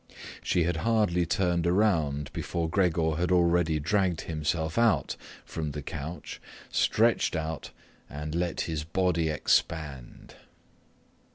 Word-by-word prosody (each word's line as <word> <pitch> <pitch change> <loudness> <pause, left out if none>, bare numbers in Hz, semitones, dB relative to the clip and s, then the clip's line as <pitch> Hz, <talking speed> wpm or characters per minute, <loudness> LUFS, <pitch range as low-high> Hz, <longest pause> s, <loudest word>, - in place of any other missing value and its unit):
She 90 - +1
had 85 0 0
hardly 105 -4 +2
turned 85 -1 +1
around 80 -7 +1
before 85 -2 -2
Gregor 80 -3 +1
had 90 +1 0
already 85 -3 +3
dragged 90 +1 +1
himself 80 +1 -2
out 115 -3 +2 0.3
from 75 -3 -4
the 75 0 -5
couch, 80 +4 -6 0.3
stretched 115 -4 +2
out, 80 -2 -3 0.4
and 75 +2 -5
let 85 0 -1
his 80 -2 -2
body 85 0 +1
expand. 75 -4 -1
85 Hz, 115 wpm, -28 LUFS, 80-90 Hz, 0.4 s, already